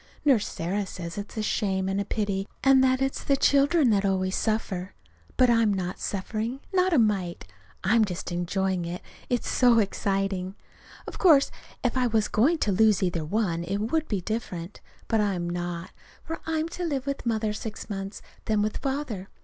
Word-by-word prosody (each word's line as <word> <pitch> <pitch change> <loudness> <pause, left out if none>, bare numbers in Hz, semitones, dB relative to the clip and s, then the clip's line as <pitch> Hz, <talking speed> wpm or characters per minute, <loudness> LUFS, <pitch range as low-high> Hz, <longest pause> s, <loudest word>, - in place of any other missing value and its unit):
Nurse 250 -8 +4
Sarah 190 +4 -2
says 170 -2 -6
it's 205 +2 -8
a 215 - 0
shame 190 -3 0
and 195 +1 0
a - - -3
pity, 200 -2 -2 0.2
and 270 -1 +6
that 260 0 +3
it's 270 - -2
the 275 - +2
children 280 -1 +4
that 200 -2 +2
always 190 -1 0
suffer. 205 -4 -2 0.4
But 255 -2 +5
I'm 230 -2 +4
not 185 -2 -3
suffering 220 +6 -3
not 370 0 +3
a 325 - +4
mite. 200 -7 +1 0.4
I'm 220 +4 +4
just 185 -3 -4
enjoying 180 +1 -1
it. 175 +1 -5 0.3
It's 245 -1 0
so 245 -2 +4
exciting. 195 -2 0 0.5
Of - - -8
course 305 -7 +5 0.3
if 250 0 +1
I 250 -1 +3
was 220 -2 +1
going 280 +11 +3
to 205 - +1
lose 210 0 +4
either 175 -3 0
one, 170 -1 -1
it 190 +4 -2
would 305 +10 0
be 200 -4 -1
different. 185 -4 -5 0.3
But 225 -1 +2
I'm 190 -4 -1
not, 175 0 -4 0.3
for 325 - -5
I 320 0 0
am 315 +1 0
to 355 +1 -5
live 280 -6 -1
with 280 -3 -3
Mother 220 -2 0
six 215 0 -6
months, 195 -1 -6 0.2
then 215 -2 +2
with 215 - -1
Father. 265 -9 -3
210 Hz, 185 wpm, -26 LUFS, 190-250 Hz, 0.5 s, and